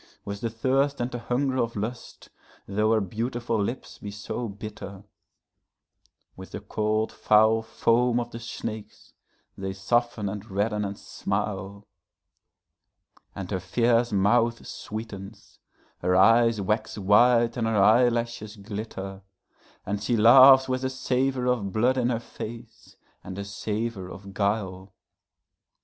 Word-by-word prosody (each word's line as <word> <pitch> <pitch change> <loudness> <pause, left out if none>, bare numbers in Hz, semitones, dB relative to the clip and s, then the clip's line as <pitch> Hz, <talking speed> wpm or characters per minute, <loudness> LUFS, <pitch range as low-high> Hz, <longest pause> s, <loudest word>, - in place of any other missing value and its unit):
With 100 0 -5
the 115 - -1
thirst 135 +5 0
and 120 +1 -2
the 120 - -4
hunger 130 +3 -1
of 115 -2 -1
lust 110 +4 -6 0.4
though 105 +2 +1
her 110 - +3
beautiful 115 +3 -2
lips 120 +6 -5
be 105 - -7
so 105 +4 -5
bitter, 100 -1 -8 1.3
With 95 0 -11
the - - -4
cold 110 +1 -1
foul 110 +1 +4
foam 115 +2 +1
of 120 0 -4
the 115 - -7
snakes 110 -2 -7 0.4
they 95 0 -4
soften 110 +2 0
and 100 +2 -6
redden 105 +2 -1
and 100 0 -5
smile; 100 +1 -4 1.5
And 95 -1 -6
her 95 - -1
fierce 115 +5 +1
mouth 115 +4 +2
sweetens, 105 -2 -8 0.4
her 90 +1 +1
eyes 115 +3 +5
wax 110 +3 -1
wide 115 +4 +4
and 115 -2 -1
her 110 -1 +1
eyelashes 115 +1 +2
glitter, 100 -2 -7 0.6
And 100 +1 -3
she 115 +3 0
laughs 130 +4 +8
with 130 0 -2
a 130 - 0
savor 130 0 -1
of 120 -6 0
blood 125 +6 +2
in 120 -1 +1
her 115 -2 0
face, 115 0 -10 0.3
and 95 0 -8
a 100 - -4
savor 105 -1 -4
of 100 +1 -10
guile. 95 -2 -2
110 Hz, 135 wpm, -26 LUFS, 100-120 Hz, 1.5 s, laughs